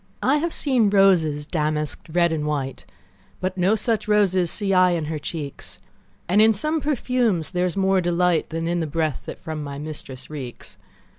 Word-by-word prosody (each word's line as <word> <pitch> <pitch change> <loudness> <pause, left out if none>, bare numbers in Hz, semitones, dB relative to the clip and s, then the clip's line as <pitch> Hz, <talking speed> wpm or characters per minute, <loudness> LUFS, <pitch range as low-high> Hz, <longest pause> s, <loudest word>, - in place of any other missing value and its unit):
I 275 +3 +3
have 335 +3 -1
seen 255 -10 +2
roses 175 -7 +3
damask'd, 150 -1 -2
red 170 -1 +4
and 150 -2 -2
white, 140 -3 -3 0.5
But 185 0 -2
no 190 +3 +2
such 220 0 -1
roses 190 -4 +3
see 200 +1 -1
I 185 -1 +5
in 165 -3 -1
her 155 0 -3
cheeks; 145 -1 -6 0.5
And 200 +4 +4
in 220 +1 +6
some 305 +9 0
perfumes 250 - 0
is - - -8
there 180 0 +1
more 190 -1 +3
delight 175 -1 +1
Than 165 +1 -3
in 175 +1 0
the 160 - -1
breath 155 -2 -1
that - - -6
from 155 -1 -6
my 140 -1 -6
mistress 145 -3 -8
reeks. 135 -6 -8
175 Hz, 180 wpm, -23 LUFS, 155-200 Hz, 0.5 s, in